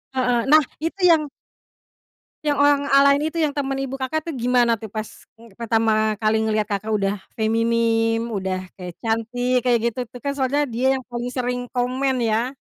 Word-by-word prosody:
Heeh. 250 -2 +2
Nah 310 -1 +7 0.2
itu 330 +5 -4
yang 305 -2 +3 1.2
yang 290 -1 +1
orang 285 0 +4
a 275 - +8
lain 285 +3 +3
itu 335 - -1
yang 305 - +2
temen 275 -1 -2
ibu 270 0 -4
Kakak 270 +4 -2
tuh - - -4
gimana 240 -1 +2
tuh 215 -1 -9
pas, 215 0 -3 0.4
eee, 230 - -15
pertama 220 -2 +1
kali 215 0 +2
ngeliat 215 -1 0
Kakak 210 +2 -2
udah 200 0 0 0.2
feminim, 225 +1 +1
udah 190 -3 -3 0.2
kayak 180 -2 -7
cantik, 245 +2 -1
kayak 240 -2 +3
gitu 235 +2 -9
tuh 245 +2 -12
kan. 280 - -2
Soalnya 275 +1 0
dia 255 +3 +1
yang 260 - -8
paling 240 +1 -4
sering 245 -1 -2
komen, 255 +1 0
ya. 230 +3 0
245 Hz, 180 wpm, -22 LUFS, 225-270 Hz, 1.2 s, a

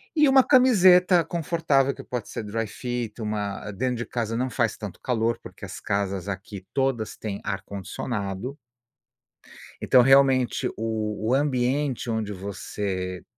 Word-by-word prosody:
e 300 -2 +5
uma 265 -1 +6
camiseta 185 -8 +6
confortável, 155 -5 +1
que - - -9
pode 125 -4 -5
ser - - -5
dry-fit, 115 +2 -4
uma 105 -1 -3
dentro 125 +5 -1
de 120 - -4
casa 115 -2 -3
não 130 +2 -1
faz 115 -3 0
tanto 105 -4 -8
calor, 115 -2 0
porque - - -13
as - - -7
casas 100 -1 -2
aqui, 100 -1 -6
todas 130 -6 0
têm 100 -2 -5
ar-condicionado 100 +4 -4 1.2
então 125 - +5
realmente 135 -1 +4
o 110 0 -2 0.3
o - - +3
ambiente 135 -2 0
onde 110 -2 -2
você 95 -1 -4
115 Hz, 135 wpm, -25 LUFS, 100-135 Hz, 1.2 s, uma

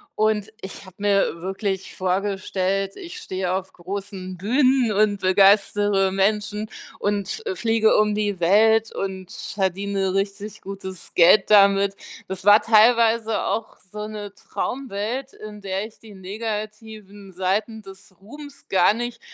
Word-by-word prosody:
und 215 -1 +1
ich 190 +1 -9
habe 185 -1 -15
mir 200 -4 +1
wirklich 190 +1 -4
vorgestellt, 195 0 -1
ich 350 -3 -9
stehe 185 -1 -3
auf 190 0 -4
großen 190 0 -7
Bühnen 255 +4 +2
und 205 -1 +1
begeistere 200 +1 +3
Menschen 210 +2 0 0.3
und 205 - -2
fliege 225 -5 +2
um 210 0 +3
die 205 -3 -1
Welt 220 +5 +4
und 190 -1 -5
verdiene 195 0 -2
richtig 200 +2 -3
gutes 190 -2 -8
Geld 180 +4 +6
damit. 200 -1 +5 0.3
Das 190 0 -6
war 205 +1 +7
teilweise 225 0 +4
auch 225 - -3
so 210 0 -5
'ne 210 -2 -7
Traumwelt, 250 +3 -4
in 210 -1 -10
der 195 +1 -3
ich 220 - -21
die 220 -2 -14
negativen 210 0 -7
Seiten 205 +5 -1
des 190 -1 -14
Ruhms 285 +6 -12
gar 190 +1 +4
nicht 240 +1 -5
205 Hz, 130 wpm, -23 LUFS, 190-215 Hz, 0.3 s, war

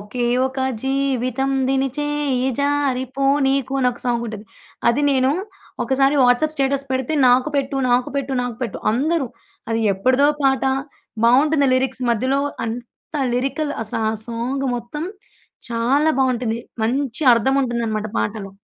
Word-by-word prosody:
ఒకే 240 +4 -3 0.2
ఒక 265 0 -6 0.3
జీవితం 270 -1 0 0.2
దినిచేయి 270 -1 0
జారి 280 -3 +1
పోనీకు! 275 -1 +1
అని 250 - +3
ఒక 240 - -13
సాంగ్ 235 -1 0
ఉంటది. 215 -1 -7 0.4
అది 235 +5 +2
నేను 260 -1 +3 0.5
ఒకసారి 270 +1 +2
వాట్సాప్ 250 +6 +3
స్టేటస్ 275 -1 0
పెడితే 260 +3 -1 0.2
"నాకు 250 +4 +4
పెట్టు. 275 0 -1
నాకు 245 +1 +2
పెట్టు. 275 -1 -2
నాకు 245 -2 -4
పెట్టు." 230 - -3
అందరూ 295 +4 0 0.4
అది 225 0 0
ఎప్పుడిదో 255 +8 +3
పాట. 270 -1 +2 0.6
బాగుంటుంది 280 +4 +4
లిరిక్స్. 260 0 -1
మధ్యలో 260 +5 +1 0.3
అంత 240 +6 -8 0.2
లిరికల్ 275 +4 -1
అసలు 225 +1 -3
ఆ - - -2 0.2
సాంగ్ 245 +4 -2
మొత్తం 240 +6 -5 0.7
చాలా 265 +7 +2
బాగుంటుంది. 240 -3 0 0.2
మంచి 265 +3 -1
అర్థం 250 +4 +1
ఉంటుందనమాట 230 -3 -2
పాటలో. 210 -2 -3
260 Hz, 130 wpm, -21 LUFS, 240-275 Hz, 0.7 s, నాకు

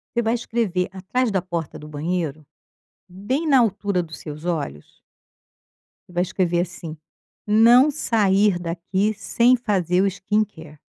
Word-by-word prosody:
Você 235 - +2
vai 225 +1 +1
escrever 225 -7 -1
atrás 220 +6 -1
da 190 -2 0
porta 170 -4 -5
do 150 - -10
banheiro, 155 0 -3 0.6
bem 205 - -3
na 275 -3 +6
altura 205 -4 +1
dos 160 -1 -10
seus 150 0 -9
olhos 150 - -4 1.1
você - - -17
vai 175 - +1
escrever 180 -2 0
assim: 170 -3 -7 0.5
"Não 235 +6 +6
sair 205 -7 +2
daqui 180 +5 -1
sem 235 +4 +3
fazer 190 -7 0
o 200 - +3
skincare". 190 -5 -3
190 Hz, 135 wpm, -22 LUFS, 170-215 Hz, 1.1 s, na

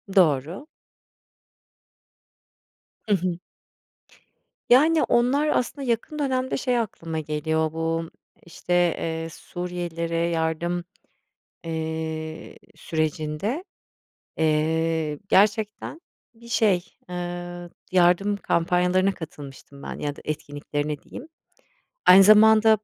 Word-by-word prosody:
Doğru. 170 - +2 2.4
Hı 205 - +5
hı. 180 -1 -2 1.3
Yani, 305 +6 +5
onlar, 265 +6 +2
aslında 270 0 -1
yakın 235 +6 -2
dönemde 260 -2 0
şey 250 -2 0
aklıma 165 -7 -4
geliyor 155 +1 -1
bu, 165 0 -2 0.4
işte, 175 +1 -5
eee, 165 -2 0
Suriyelilere 175 -2 -5
yardım, 170 +1 -1 0.8
eee, 160 -1 -5 0.2
sürecinde, 155 - -2 0.7
eee, 160 0 +1
gerçekten 210 - +1 0.3
bir 235 0 -16
şey, 200 -6 +2 0.2
ııı, 175 0 -6 0.2
yardım 185 +3 +3
kampanyalarına 180 +2 +1
katılmıştım 140 -4 -11
ben - - -6
ya 145 -1 -3
da - - -13
etkinliklerine 145 0 -3
diyeyim. 270 - -10 0.8
Aynı 190 +2 +9
zamanda, 215 +2 +7
175 Hz, 85 wpm, -24 LUFS, 160-210 Hz, 2.4 s, Aynı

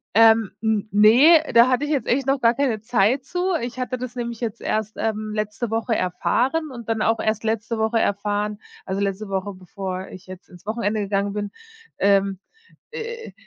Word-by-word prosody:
Ähm, 225 -2 +5
n 220 -1 0
ne, 240 - +7
da 235 +2 +7
hatte 260 +3 +1
ich 295 - -3
jetzt 275 -7 0
echt 265 +2 +1
noch 275 0 +2
gar 235 -1 +4
keine 240 -6 0
Zeit 240 +3 +1
zu. 360 +3 -1
Ich 245 +2 -5
hatte 255 0 -2
das 255 0 -6
nämlich 235 -2 -4
jetzt 225 -3 -4
erst, 215 0 -2
ähm, 215 -1 -2
letzte 215 +2 -3
Woche 225 0 0
erfahren 260 - 0
und 235 -3 -9
dann 225 -1 -1
auch 225 0 +2
erst 215 0 -1
letzte 225 +1 -2
Woche 220 +1 +1
erfahren 205 +1 -1 0.3
also 195 +1 -2
letzte 200 +1 -2
Woche, 195 +1 -3
bevor 185 0 -6
ich 185 0 -12
jetzt 185 -1 -11
ins 180 +1 -16
Wochenende 215 -1 -1
gegangen 200 0 -1
bin, 205 -1 -4 0.5
ähm, 195 -1 +2 0.5
äh, 465 0 -7
220 Hz, 185 wpm, -22 LUFS, 205-245 Hz, 0.5 s, ne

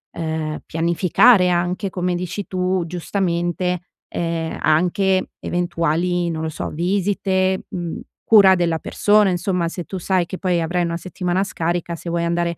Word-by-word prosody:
ehm, 160 -2 -3
pianificare 180 +5 +4
anche 180 +3 0
come 180 -1 -1
dici 180 +3 -4
tu, 185 -1 0
giustamente, 175 0 -1 0.3
ehm, 165 -1 -2
anche 185 +4 +2
eventuali, 175 0 0
non 160 -1 -4
lo 160 - -2
so, - - -5
visite, 190 +2 0
mhmm, 175 -2 -4 0.3
cura 200 -4 +8
della 170 -2 +1
persona; 210 +3 +3
insomma, 180 -1 -1
se 175 +1 -6
tu 190 - -6
sai 185 0 +1
che 185 - -5
poi 180 -3 +1
avrai 175 +2 0
una 170 0 -2
settimana 180 +1 -2
scarica, 170 -2 -2
se 170 - -7
vuoi 170 0 0
andare 170 0 -1
175 Hz, 150 wpm, -21 LUFS, 170-185 Hz, 0.3 s, cura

